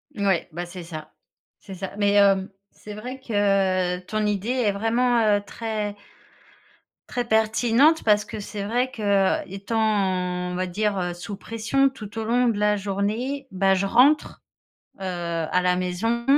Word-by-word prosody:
Ouais, 195 -5 0
bah 175 +2 -5
c'est 175 0 -9
ça, 155 -2 -9 0.5
c'est 195 - -10
ça. 190 +1 -6
Mais, 205 -1 +2
hem, 200 -1 +4 0.2
c'est 210 - -11
vrai 250 +5 -7
que 195 -5 +1
ton 215 +4 -2
idée 205 +1 -1
est 245 -5 +2
vraiment, 225 0 +2
heu, - - -4
très 210 -1 -4 1.1
très 245 -1 -2
pertinente, 235 +7 +3
parce 210 -1 +4
que 215 +1 -7
c'est 205 0 -6
vrai 245 +5 0
qu'étant, 195 -3 0
on - - -5
va 185 +1 -2
dire, 210 +3 -1
heu, 175 -1 -2
sous 190 +3 -7
pression 230 +6 +1
tout 225 -4 -8
au - - -2
long 240 +2 +2
de 215 -3 -1
la 210 0 +2
journée, 215 +8 -2
bah, 195 0 +2
je 190 +1 +1
rentre, 275 +8 +3 0.5
heu, - - -12
à 170 -2 -1
la 180 0 +2
maison, 190 +7 -1
205 Hz, 160 wpm, -24 LUFS, 185-225 Hz, 1.1 s, hem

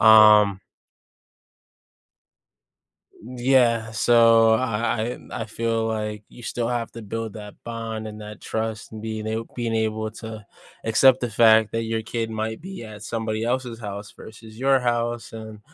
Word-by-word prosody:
um 105 -3 +7 2.6
Y 125 +3 -10
yeah, 120 -4 +3
so, 115 0 +5
I 115 0 -1
I - - -7
I - - -4
I - - -3
feel 115 0 -1
like 105 -1 -3
you 120 - -14
still 115 0 -2
have 120 -2 -2
to 115 - -8
build 115 +1 -5
that 105 -1 -9
bond 115 -1 -5
and 105 0 -9
that 105 0 -9
trust 110 -1 -4
and 110 - -7
being 110 -1 -4
ab 110 +1 -3
being 115 -2 -2
able 110 0 -1
to 110 -2 -7 0.4
accept 130 +3 +5
the 120 -2 -2
fact 110 -1 +5
that 115 0 -1
your 110 0 -2
kid 115 0 -3
might 110 +2 -3
be 190 -2 -8
at 105 -1 -10
somebody 110 -1 -2
else's 120 -1 -2
house 105 -2 -7
versus 110 0 -13
your 135 0 +3
house, 120 -1 -1
and, 110 -1 -9
110 Hz, 160 wpm, -24 LUFS, 110-115 Hz, 2.6 s, um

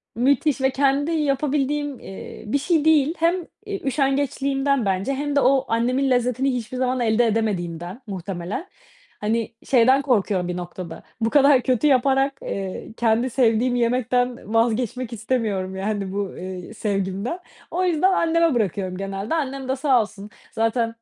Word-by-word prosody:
Müthiş 275 +3 +2
ve 265 - +3
kendi 280 +3 +1
yapabildiğim, 290 -1 0
eee, 195 - -9
bir 280 - +1
şey 315 +1 +1
değil. 310 -1 +4
Hem, 335 +2 +3 0.3
iii, 405 -1 -5
üşengeçliğimden 275 -1 0
bence 195 +7 0
hem 290 +1 -2
de - - +5
o 270 +1 +3
annemin 250 +4 +1
lezzetini 250 +2 +1
hiçbir 245 +1 -4
zaman 255 0 0
elde 235 0 +3
edemediğimden 190 -2 -2
muhtemelen. 190 - -5 0.5
Hani, 225 +2 -1
şeyden 260 +2 +4
korkuyorum 205 -9 +1
bir 180 0 -3
noktada 175 -1 -7 0.2
bu 225 - +2
kadar 280 -2 +5
kötü 255 +3 +1
yaparak, 270 +1 +3
eee, 195 +2 -5
kendi 235 +2 +2
sevdiğim 245 0 +2
yemekten 245 -1 0
vazgeçmek 235 +1 0
istemiyorum, 210 -5 -2
yani, 200 -1 -2
bu, 200 -1 -3
eee, 185 +2 -7
sevgimden. 200 - -2 0.3
O 365 +2 0
yüzden 360 +2 +3
anneme 335 -3 +2
bırakıyorum 190 -3 -1
genelde. 195 +8 -3
Annem 275 -3 -3
de 265 - +1
sağ 265 -3 +3
olsun 210 -1 -8 0.2
zaten 230 0 0
245 Hz, 145 wpm, -23 LUFS, 210-275 Hz, 0.5 s, de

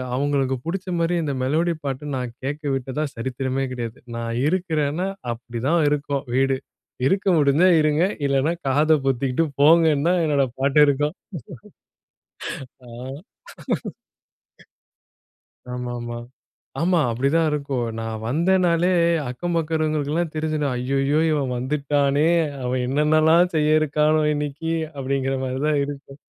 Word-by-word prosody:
அவங்களுக்கு 135 -1 0
புடிச்ச 185 +2 -4
மாதிரி 165 +1 +1
இந்த 145 - -2
மெலோடி 160 +6 +1
பாட்டு 135 +1 -3
நான் 125 -2 -4
கேட்கவிட்டதா 140 -1 -2
சரித்திரமே 130 +2 -2
கிடையாது. 120 -2 -5 0.2
நான் 115 0 -3
இருக்கிறேனா, 165 -1 0 0.2
அப்படி 120 0 -6
தான் 170 +2 +3
இருக்கும் 145 -1 -1
வீடு 135 0 +2 0.5
இருக்க 195 +3 0
முடிஞ்சா 150 +5 +4
இருங்க. 155 +2 +2 0.2
இல்லன்னா 140 +4 +1
காத 155 +4 +4
பொத்திகிட்டு 135 +3 +1 0.2
போங்கன்னு 160 0 +5
தான் 180 -1 +2
என்னோட 145 -3 +2 0.2
பாட்டு 140 +2 +3
இருக்கும். 145 +4 0 1.7
ஆ. - - -12 2.9
ஆமா, 125 0 -4
ஆமா. 120 0 -5 0.6
ஆமா 175 0 +3
அப்படித்தான் 140 +8 +1
இருக்கும். 140 -4 -2 0.2
நான் 110 -1 -5
வந்தேனாலே 175 +4 +2 0.4
அக்கம் 175 +8 -3
பக்கம் 165 - +1
இருக்கிறவங்களுக்குலாம் 155 +1 -1
தெரிஞ்சுடும். 155 -3 -1
ஐய்யயோ! 135 +4 +1
இவன் 140 -4 0
வந்துட்டானே, 140 +2 +1 0.4
அவன் 125 0 -1
என்னென்னல்லாம் 155 +5 +3
செய்ய 155 0 +4
இருக்கானோ 155 +1 +2
இன்னிக்கி! 150 +2 -3 0.3
அப்படிங்கிற 135 0 -1
மாதிரி 130 +1 -3
தான் 150 -2 +2
இருக்கும். 140 -1 -9
145 Hz, 115 wpm, -22 LUFS, 135-155 Hz, 2.9 s, போங்கன்னு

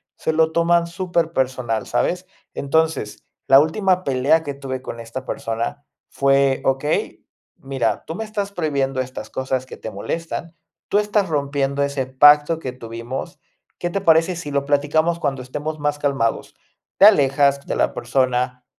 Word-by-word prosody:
se - - -1
lo 160 0 +3
toman 170 0 +3
superpersonal, 160 -10 -1
¿sabes? - - -1 0.3
Entonces, 155 -5 -1 0.2
la 135 - +8
última 185 +4 +1
pelea 140 +3 +2
que 145 -2 -4
tuve 135 -2 -6
con 115 - -7
esta 115 +3 -7
persona 120 +2 -4 0.3
fue: 135 -1 +2
"Okey, 135 +3 -1 0.3
mira, 135 -4 -2
tú 160 - -6
me 220 - -4
estás 210 -2 -4
prohibiendo 140 -6 -1
estas 130 0 -7
cosas 130 -1 -2
que - - -10
te 110 - -7
molestan, 165 - -5 0.3
tú 205 - +2
estás 210 -1 +1
rompiendo 140 -2 0
ese 140 -2 -1
pacto 145 +4 +5
que 130 -5 -5
tuvimos, 115 +1 -7 0.4
¿qué 175 - -2
te 200 - -1
parece 165 0 +4
si 165 -4 -6
lo 140 0 0
platicamos 150 +4 +1
cuando 135 -5 -2
estemos 150 +5 -5
más 145 0 -1
calmados?". 135 -6 -1 0.4
Te 195 - +7
alejas 140 -6 +4
de - - -2
la - - +1
persona, 125 0 -1
140 Hz, 155 wpm, -21 LUFS, 130-160 Hz, 0.4 s, la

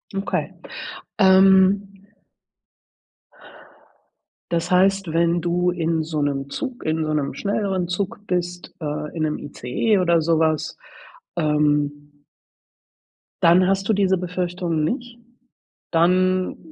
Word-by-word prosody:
Okay. 195 - -2 0.7
Ähm 190 +1 +5 2.6
Das 170 +1 -1
heißt, 190 -2 +2
wenn 170 0 +2
du 175 +1 +1
in 165 -2 0
so 155 -2 -2
'nem 140 -1 -2
Zug 260 - -5
in 155 0 -1
so 155 - -1
'nem 145 -2 -2
schnelleren 195 -3 -1
Zug 200 +4 -4
bist, 175 0 -3
äh, 150 +1 -4
in 160 - -3
'nem 155 -1 0
ICE 145 - -1
oder 170 -3 +2
so 165 0 +2
was, 155 -1 0 0.6
ähm 145 -2 0 1.3
dann 180 +2 +5
hast 195 0 0
du 220 - +3
diese 190 -2 +2
Befürchtungen 175 -2 -2
nicht. 240 - -3 0.7
Dann 185 +2 +2
175 Hz, 110 wpm, -22 LUFS, 155-190 Hz, 2.6 s, Ähm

